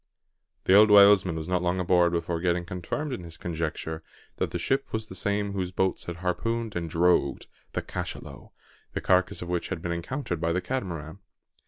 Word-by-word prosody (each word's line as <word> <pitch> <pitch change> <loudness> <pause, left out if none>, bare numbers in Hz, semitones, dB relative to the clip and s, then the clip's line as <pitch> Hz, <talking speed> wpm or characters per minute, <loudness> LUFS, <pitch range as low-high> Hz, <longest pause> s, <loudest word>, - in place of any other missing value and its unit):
The 95 - +3
old 105 +2 +8
whalesman 100 -4 +7
was 80 0 -4
not 90 -1 +1
long 90 +1 0
aboard 90 -1 +3
before 85 0 -1
getting 85 0 0
confirmed 90 - -4
in 110 - -5
his 85 -1 -7
conjecture 80 -1 -4 0.4
that - - -1
the - - -3
ship 135 +1 -1
was 110 -1 -2
the 100 - -10
same 100 +2 -1
whose 95 -2 -2
boats 95 0 -1
had 85 - -5
harpooned 115 +4 -1
and 85 -1 -2
"drogued" 85 -4 +2 0.3
the - - -2
cachalot, - - -6 0.4
the - - -3
carcass 90 -1 +2
of 85 - -8
which 90 -1 -2
had - - -3
been 85 +1 -4
encountered 85 - -3
by 85 0 +1
the 90 - 0
Catamaran. 90 - -4
90 Hz, 190 wpm, -27 LUFS, 85-100 Hz, 0.4 s, old